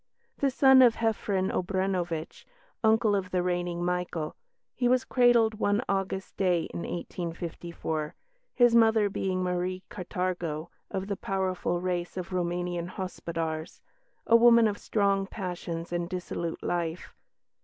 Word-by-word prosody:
The 280 - +3
son 265 0 +6
of 240 -3 +6
Jefrenn 205 -4 0
Obrenovitch, 180 -3 -2 0.4
uncle 220 -1 +4
of 195 -2 -1
the 180 -1 0
reigning 175 -1 -1
Michael, 180 -3 -2 0.4
he 245 - 0
was 255 +1 +3
cradled 240 -3 +4
one 205 +3 +2
August 195 -1 -2
day 180 -4 +2
in - - -4
1854, 170 -2 -4 0.4
his 240 -2 +5
mother 220 -3 +4
being 185 -1 -1
Marie 180 +1 -2
Catargo, 175 -4 -3 0.2
of 190 0 -3
the 200 0 -2
powerful 185 -2 -1
race 180 0 -3
of 185 0 -5
Roumanian 175 -1 -2
"Hospodars," 165 -3 -4 0.5
a 230 - +5
woman 235 -1 +7
of 205 -1 -3
strong 200 -2 +1
passions 175 -4 -5
and 175 0 -2
dissolute 175 -2 -4
life. 170 -1 -3
185 Hz, 130 wpm, -28 LUFS, 175-205 Hz, 0.5 s, woman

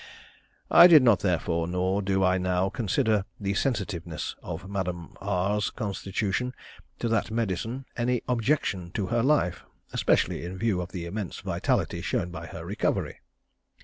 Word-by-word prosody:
I 170 - +10
did 160 -6 +8
not, 115 -5 +5
therefore, 85 -3 0
nor 90 +3 0
do 95 -1 +1
I 95 0 +3
now, 90 +1 +1
consider 110 0 +1 0.2
the 100 -1 -1
sensitiveness 95 - -2
of 85 +3 -6
Madame 90 -4 -4
R's 100 +1 0
constitution 105 +3 -2 0.4
to - - -2
that 115 -1 +1
medicine 115 +4 -2
any 120 0 0
objection 115 - 0
to 100 - -1
her 120 - +3
life, 130 - +2 0.3
especially - - +1
in 90 +2 -6
view 105 -4 0
of 90 - -7
the 90 -3 -5
immense 95 +1 -5
vitality - - -1
shown 90 - -1
by 85 -1 -7
her - - -8
recovery. - - -1
100 Hz, 145 wpm, -27 LUFS, 90-115 Hz, 0.4 s, I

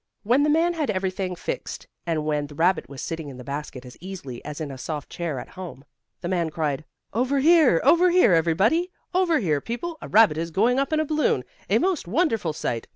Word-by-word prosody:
When 245 +6 +3
the 300 - +3
man 330 +3 +3
had 310 -6 -2
everything 185 -2 -2
fixed - - -5 0.2
and 160 -2 -1
when 150 -1 -1
the 145 - -12
rabbit 165 -5 +1
was 140 -2 -7
sitting 160 -3 -5
in 130 - -10
the 125 - -9
basket 140 -1 -6
as 125 - -12
easily 175 -10 -8
as 150 +1 -7
in 150 -3 -4
a 135 - -8
soft 150 +1 -5
chair 170 -5 -3
at - - -9
home, 175 -7 -9 0.4
the 175 - -3
man 175 -3 0
cried: 155 -2 -2 0.3
"Over 255 +6 +1
here! 300 - +5
Over 355 +2 +5
here, 355 - +5
everybody! 195 - +2 0.2
Over 360 -3 +3
here, 155 - 0
people! 315 +8 -5
A - - -7
rabbit 205 -7 +5
is 165 0 -2
going 230 +10 +2
up 275 +1 -1
in 310 - +2
a 310 - +1
balloon! 305 0 +1 0.3
A - - +4
most 360 - 0
wonderful 225 - +1
sight! 120 -6 -3
185 Hz, 220 wpm, -24 LUFS, -, 0.4 s, here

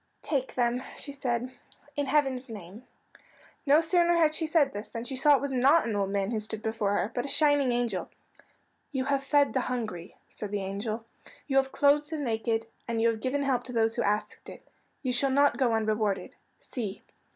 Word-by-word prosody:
"Take 270 -4 -2
them," 245 0 +1 0.2
she 285 - -4
said, 250 -3 -2 0.4
"in 285 -1 -1
heaven's 265 -3 +1
name." 210 +2 -10 0.8
No 295 +3 +6
sooner 345 +1 +3
had 320 -2 +4
she 320 0 -1
said 305 -4 +3
this 205 +2 -6
than 230 - -5
she 265 +2 -5
saw 290 +3 +5
it - - 0
was 280 -1 -2
not 270 +4 +4
an 220 - -1
old 200 -1 0
man 200 +1 -1
who 225 - 0
stood 215 0 -4
before 220 -2 0
her, 205 - 0
but 245 - -1
a - - -4
shining 290 -2 +3
angel. 240 -6 -1 0.8
"You 265 -3 -1
have 275 0 0
fed 285 +1 +3
the 260 - +2
hungry," 215 -8 -4
said 210 - -7
the 200 -1 -2
angel, 215 +4 -4 0.4
"you 270 -2 0
have 270 0 +2
clothed 290 +1 +3
the 320 - -3
naked, 225 -4 -1 0.2
and 230 -1 -1
you 230 +1 +4
have 220 -1 -3
given 280 +4 0
help 260 -3 +1
to 250 - -7
those 225 -1 +2
who - - -1
asked 210 +1 -2
it. - - -12 0.4
You 255 -2 0
shall 270 +3 +2
not 285 +2 +3
go 255 -4 +2
unrewarded. 215 -3 -1 0.2
See!" 215 -6 -6
250 Hz, 205 wpm, -28 LUFS, 220-280 Hz, 0.8 s, No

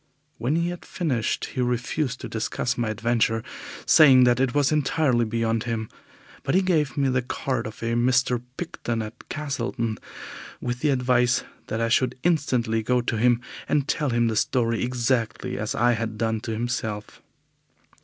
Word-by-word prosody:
When 125 +7 0
he 170 +1 +1
had 175 0 -6
finished, 135 - -1
he 130 - -1
refused 125 +3 -1
to - - -5
discuss 115 +2 -2
my 120 -3 -1
adventure, 115 +1 +1 0.4
saying 135 -5 +7
that 125 0 +4
it 130 0 +1
was 145 -1 +3
entirely 145 -5 +2
beyond 115 0 -1
him, 115 -2 -3 0.5
but - - -1
he 190 - +4
gave 155 -7 +1
me 140 -1 +2
the 125 0 +1
card 125 -1 -2
of 110 +2 -9
a 115 0 0
Mr. 125 0 +2 0.2
Picton 120 -9 -3
at 110 +3 -11
Castleton, 120 -6 -3 0.6
with 125 0 -3
the 150 - +1
advice 125 -2 +2 0.2
that 110 - -2
I 115 0 +1
should 125 +2 +2
instantly 125 -9 +1
go 125 +3 +1
to 120 - -2
him 120 +1 +3 0.3
and 145 -2 +1
tell 150 -2 0
him 120 -1 +2
the 110 - -1
story 115 0 +1
exactly 125 0 -1
as 105 - -2
I 120 +1 +3
had 115 -2 -2
done 110 0 0
to 115 - -4
himself. 110 -2 -3
120 Hz, 170 wpm, -25 LUFS, 115-130 Hz, 0.6 s, saying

